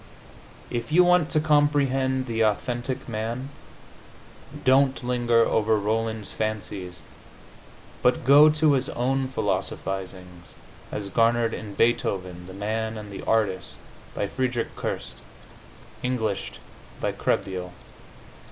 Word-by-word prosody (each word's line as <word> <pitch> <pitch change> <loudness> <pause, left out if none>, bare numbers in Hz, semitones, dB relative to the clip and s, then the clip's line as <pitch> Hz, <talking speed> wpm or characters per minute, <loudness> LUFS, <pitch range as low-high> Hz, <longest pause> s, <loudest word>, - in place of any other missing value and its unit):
If 120 +4 -3
you 180 +3 +6
want 180 -3 +4
to 155 - +2
comprehend 140 -3 +2
the 115 -2 -2
authentic 120 +4 -1
man, 115 +4 -4 1.2
don't 130 0 +4
linger 120 -1 +2
over 110 0 +2
Rolland's 110 +1 -2
fancies 100 -6 -4 1.0
but 125 0 +2
go 145 +3 +8
to 155 0 +3
his 135 0 0
own 130 +2 0
philosophizings, 95 -4 -4 0.4
as 100 -1 -4
garnered 115 +2 +2
in 105 -2 -7
"Beethoven, 95 -7 0
the 95 - -9
Man 110 +2 -2
and 105 -1 -8
the - - -6
Artist," 105 -5 0 0.4
by - - -1
Friedrich 125 +2 -2
Kerst, - - -4 0.9
Englished 110 -6 -2 0.4
by - - 0
Krehbiel. 90 -2 -2
115 Hz, 110 wpm, -25 LUFS, 100-130 Hz, 1.2 s, go